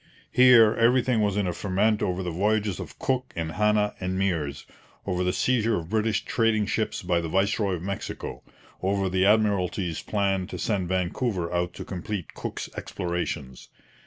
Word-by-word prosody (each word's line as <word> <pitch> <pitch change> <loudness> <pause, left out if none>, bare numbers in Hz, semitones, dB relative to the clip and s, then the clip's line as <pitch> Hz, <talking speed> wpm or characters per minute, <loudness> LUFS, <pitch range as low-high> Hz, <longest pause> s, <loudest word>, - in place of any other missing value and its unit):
Here, 120 -4 +7
everything 120 0 +3
was 105 -1 +1
in 105 - +1
a 90 - -1
ferment 105 +4 +1
over 90 +1 -1
the 90 - -3
voyages 105 +2 0
of - - -8
Cook 130 -1 -1
and 80 -1 -3
Hanna 105 +1 +2
and 95 0 -2
Meares, 80 -7 -1 0.4
over 90 -2 -1
the 90 - +1
seizure 115 +3 +1
of 85 0 -6
British 110 -2 +1
trading 115 -2 +2
ships 110 0 -2
by 90 -1 +1
the 80 - -4
viceroy 100 +2 +1
of 85 - -7
Mexico, 100 0 -5 0.4
over 95 0 0
the 95 +1 +2
Admiralty's 100 -5 +1
plans 100 -2 -1
to - - -5
send 95 -5 -1
Vancouver 90 0 -1
out 90 0 -1
to - - -7
complete 95 -1 -5
Cook's - - -5
explorations. 85 -7 -4
100 Hz, 165 wpm, -26 LUFS, 90-110 Hz, 0.4 s, Here